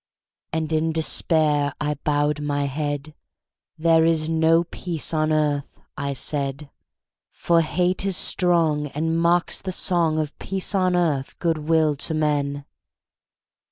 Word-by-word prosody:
And 160 0 -2
in 160 +1 +1
despair 155 -2 +1
I 150 0 -1
bowed 145 0 -1
my 145 -1 -1
head; 145 +1 -4 0.6
"There 165 0 +3
is 160 -1 +2
no 165 +1 +3
peace 170 -2 -1
on 155 0 +1
earth," 150 -2 -1 0.2
I 140 -2 -3
said: 140 +1 -3 0.6
"For 170 -1 +1
hate 180 +4 0
is 195 -2 +1
strong, 165 -5 +2
And 160 +3 -2
mocks 170 +1 +1
the 190 - -4
song 170 -4 0
Of 155 -2 -3
peace 190 +1 -1
on 185 -2 +2
earth, 155 -6 -1
good 160 -3 -2
will 160 -2 +3
to 160 - -2
men!" 145 -2 -1
155 Hz, 135 wpm, -23 LUFS, 145-165 Hz, 0.6 s, There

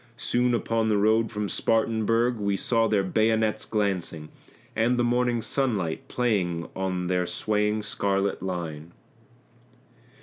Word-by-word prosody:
Soon 125 0 +1
upon 115 -1 0
the 105 - +3
road 110 +2 +3
from 105 -2 -2
Spartanburg 115 +2 +1
we 100 -2 0
saw 115 +2 +1
their 105 -3 +2
bayonets 110 +2 +1
glancing, 90 -7 -2 0.5
And 120 +3 +2
the 120 - +2
morning 120 -1 +1
sunlight 105 - -1
playing 90 -9 0
on 95 -1 -2
their 90 0 0
swaying 105 0 0
scarlet 100 -1 -1
line. 85 -3 -5
105 Hz, 125 wpm, -26 LUFS, 95-115 Hz, 0.5 s, the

